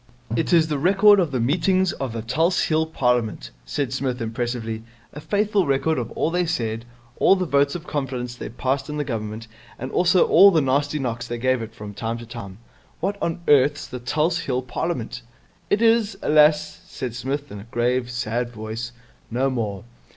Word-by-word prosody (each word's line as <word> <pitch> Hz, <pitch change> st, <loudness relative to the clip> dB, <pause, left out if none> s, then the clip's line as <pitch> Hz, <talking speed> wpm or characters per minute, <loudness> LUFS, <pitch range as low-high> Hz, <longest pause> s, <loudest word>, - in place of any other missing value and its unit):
'It 115 Hz, -, 0 dB
is 165 Hz, -2 st, +5 dB
the 150 Hz, -3 st, -1 dB
record 200 Hz, +5 st, +6 dB
of 175 Hz, -4 st, +2 dB
the 130 Hz, -2 st, -2 dB
meetings 185 Hz, +9 st, +2 dB
of 135 Hz, -3 st, -4 dB
the 115 Hz, -1 st, -5 dB
Tulse 165 Hz, +10 st, +1 dB
Hill 160 Hz, 0 st, +1 dB
Parliament,' 125 Hz, -, 0 dB
said 130 Hz, -, -2 dB
Psmith 130 Hz, -2 st, -2 dB
impressively. 115 Hz, -1 st, -3 dB, 0.3 s
'A 150 Hz, -, -8 dB
faithful 205 Hz, 0 st, +1 dB
record 140 Hz, +2 st, +1 dB
of 120 Hz, -2 st, -4 dB
all 160 Hz, -, 0 dB
they 175 Hz, 0 st, 0 dB
said, 115 Hz, -7 st, -2 dB, 0.3 s
all -, -, +5 dB
the 185 Hz, -1 st, -1 dB
votes 140 Hz, -1 st, +2 dB
of 175 Hz, -1 st, -6 dB
confidence 130 Hz, -5 st, -3 dB
they 120 Hz, -, -7 dB
passed 135 Hz, +4 st, -2 dB
in 150 Hz, -, -4 dB
the 150 Hz, -, 0 dB
Government, 110 Hz, -3 st, -5 dB, 0.3 s
and 130 Hz, +2 st, -6 dB
also 180 Hz, +1 st, +4 dB
all 200 Hz, -, +8 dB
the 170 Hz, -5 st, +3 dB
nasty 145 Hz, +2 st, +1 dB
knocks 120 Hz, -3 st, -3 dB
they 120 Hz, -, -4 dB
gave 130 Hz, 0 st, +1 dB
it 115 Hz, 0 st, -8 dB
from 105 Hz, -2 st, -8 dB
time 115 Hz, +3 st, -3 dB
to 115 Hz, -, -9 dB
time.' 115 Hz, -5 st, -8 dB, 0.4 s
'What 195 Hz, +4 st, -1 dB
on 170 Hz, +1 st, -2 dB
earth's 145 Hz, +1 st, +4 dB
the 125 Hz, -, -7 dB
Tulse 155 Hz, +7 st, 0 dB
Hill 130 Hz, -3 st, -2 dB
Parliament?' 125 Hz, -2 st, -3 dB, 0.5 s
'It 205 Hz, +3 st, +2 dB
is, 225 Hz, -2 st, +3 dB
alas,' 150 Hz, 0 st, +3 dB
said 125 Hz, -3 st, -5 dB
Psmith 135 Hz, +4 st, -4 dB
in 105 Hz, -, -7 dB
a 100 Hz, -, -10 dB
grave, 120 Hz, +1 st, 0 dB
sad 120 Hz, 0 st, -2 dB
voice, 115 Hz, +1 st, -6 dB, 0.4 s
'no 130 Hz, +4 st, 0 dB
more. 105 Hz, -6 st, -3 dB
130 Hz, 190 wpm, -23 LUFS, 120-160 Hz, 0.5 s, all